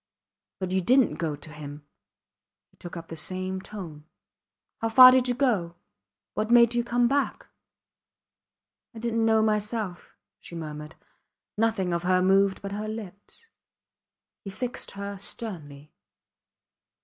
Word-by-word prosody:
But 185 -1 -3
you 190 0 +1
didnt 255 +6 +3
go 160 -3 -1
to 150 +2 -12
him, 145 0 -9 0.9
he - - -31
took 175 0 -9
up 165 0 -10
in - - -4
the - - -7
same 185 +3 -2
tone. 170 -8 -9 0.7
How 225 - -1
far 255 +2 +10
did 255 0 +3
you 245 - 0
go? 210 -11 0 0.6
What 215 +1 -2
made 235 0 +6
you 240 0 +1
come 240 0 +2
back? 280 +2 -1 1.5
I - - -9
didnt 230 0 -1
know 220 -1 +4
myself, 210 -3 -2 0.2
she 170 - -11
murmured. 150 -1 -7 0.6
Nothing 210 -5 0
of 170 - 0
her 185 +1 +2
moved 195 +1 +3
but 200 - -5
her 210 +2 -4
lips. 215 - -9 0.9
He 195 - -6
fixed 240 +5 -5
her 200 0 -5
sternly. 155 -9 -7
200 Hz, 140 wpm, -26 LUFS, 170-230 Hz, 1.5 s, far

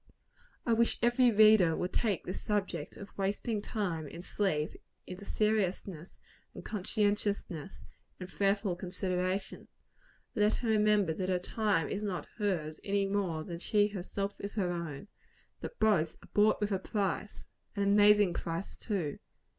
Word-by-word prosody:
I 235 - +3
wish 230 +1 +2
every 240 +1 +5
reader 215 -6 +6
would 180 - -3
take 210 -6 0
this 180 - -5
subject 205 -2 -2
of 200 - -10
wasting 205 +2 -1
time 180 -8 -3
in 170 +5 -9
sleep 175 -7 0 0.3
into 185 +2 -8
serious, 210 -4 +1
and 175 -3 -12
conscientious, 205 0 0
and 160 0 -6 0.6
prayerful 200 -1 +1
consideration. 185 +1 -2 0.7
Let 210 -1 +3
her 235 - -2
remember 210 -5 +3
that 185 +3 -3
her 185 - +2
time 190 -3 0
is 205 - -3
not 195 -4 -3
hers, 165 -7 -1
any 200 0 +1
more 195 -5 -1
than 170 +1 -6
she 205 +3 +2
herself 200 +1 -4
is 200 +1 -6
her 185 -5 0
own; 170 0 -5 0.5
that - - -7
both 170 -8 +2
are - - -16
"bought 210 +1 +4
with 210 0 -1
a 190 - +1
price" 205 +1 -2 0.3
an 200 - 0
amazing 205 -1 +5
price, 170 +3 -4
too! 180 -10 -3
200 Hz, 145 wpm, -32 LUFS, 180-210 Hz, 0.7 s, reader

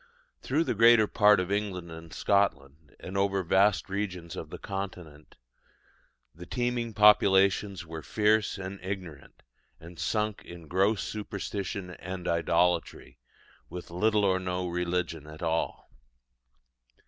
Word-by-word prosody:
Through 150 +5 +1
the - - -1
greater 115 0 +6
part 105 -1 +4
of 90 +1 -2
England 95 -4 -2
and 80 0 -10
Scotland, 75 -7 -1
and 95 - -8
over 100 -1 +1
vast 95 +3 +3
regions 95 -4 -4
of - - -7
the - - -7
Continent, 90 -6 -7 1.0
the 90 +3 -11
teeming 120 -2 -2
populations 100 -2 +4
were 80 -1 -7
fierce 105 +2 +1
and 95 +1 -7
ignorant, 90 -7 -7 0.4
and 85 +1 -13
sunk 105 -1 -1
in 85 -2 -11
gross 95 +5 +1
superstition 100 -2 -5
and 90 0 -7
idolatry, 85 +1 0 0.5
or - - -11
with 90 -1 -8
little 105 +3 +2
or 95 -1 +2
no 90 0 -3
religion 85 -3 -2
at 80 +2 -10
all. 80 0 -2
95 Hz, 130 wpm, -28 LUFS, 85-105 Hz, 1.0 s, greater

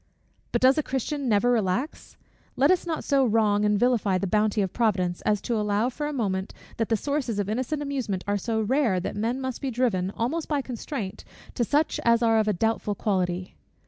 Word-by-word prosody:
But - - 0
does 265 +4 +6
a - - +3
Christian 270 0 -2
never 225 +3 +3
relax? 235 - -1 0.4
Let 280 +5 +4
us 365 -1 +1
not 320 -2 -2
so 275 -1 +3
wrong 215 -3 +2
and 210 -1 +2
vilify 225 -6 +2
the 195 - -2
bounty 210 +2 +1
of 190 - -4
Providence, 185 -7 0
as 210 -1 +2
to 235 - -2
allow 210 +2 +1
for 295 +4 -4
a - - -3
moment 195 -8 -2 0.2
that 225 - -1
the 225 - +2
sources 280 -4 -2
of 205 -2 -1
innocent 255 +7 -2
amusement 250 -10 -3
are 205 0 0
so 225 +1 -1
rare, 230 -4 +2
that 180 - -4
men 230 +5 -1
must 260 -2 -4
be 275 - -2
driven, 225 -7 0
almost 300 +8 -1
by 290 -3 0
constraint, 235 -4 -5 0.3
to 240 - 0
such 295 +6 +1
as 235 0 +4
are 225 -1 +4
of 215 - +1
a 210 - +2
doubtful 215 +1 -1
quality. 185 -3 -1
225 Hz, 210 wpm, -26 LUFS, 205-260 Hz, 0.4 s, does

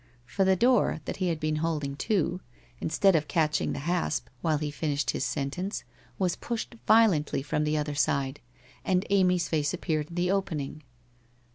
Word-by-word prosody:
For 195 +10 0
the 190 0 +4
door, 240 -4 +3
that - - -4
he 185 - 0
had 165 -3 -1
been 155 0 0
holding 150 -3 -1
to, 180 -2 0 0.4
instead 185 +4 +3
of 150 -2 +1
catching 155 -2 +1
the - - -3
hasp, 160 -7 -1
while 155 -2 +2
he 150 0 -3
finished 145 -4 -1
his - - -2
sentence, 160 +10 -3 0.3
was 180 -3 +1
pushed 235 0 -4
violently 195 -12 +4
from 150 +1 -1
the 150 0 +1
other 150 0 -1
side, 140 -2 0 0.4
and 185 -1 +1
Amy's 180 -3 +3
face 150 0 0
ap - - -12
peared 155 -3 -1
in 170 - -9
the 180 +1 +1
opening. 155 -7 -2
160 Hz, 175 wpm, -28 LUFS, 150-185 Hz, 0.4 s, the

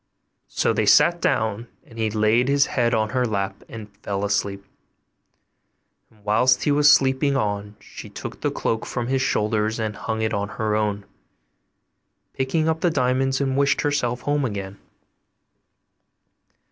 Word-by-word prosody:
So - - 0
they - - 0
sat 170 0 +5
down, 110 +1 0 0.2
and 115 - -13
he 110 -1 +1
laid 110 +3 +2
his 140 0 +3
head 120 -2 0
in 110 -1 0
her 125 +1 0
lap 100 -4 -2
and 105 -2 -10
fell 100 -1 -3
asleep; 100 -1 -2 1.4
and 105 -2 -26
whilst 125 +5 +3
he 145 - +2
was 145 +1 +6
sleeping 135 +1 +3
on 105 -3 -3
she - - -11
took - - -8
the - - 0
cloak 110 - -2
from 120 0 -3
his 135 0 +1
shoulders, 110 -1 0
hung 110 0 -3
it 110 0 -1
on 100 0 -2
her 110 -1 -1
own, 105 -2 -1 1.3
picked 130 +3 -3
up 160 0 0
the 175 - +3
diamonds, 130 -2 0
and 135 -2 -1
wished 140 0 +2
herself 125 -4 -1
home 145 +1 0
again. 100 -5 -5
115 Hz, 150 wpm, -23 LUFS, 105-130 Hz, 1.4 s, was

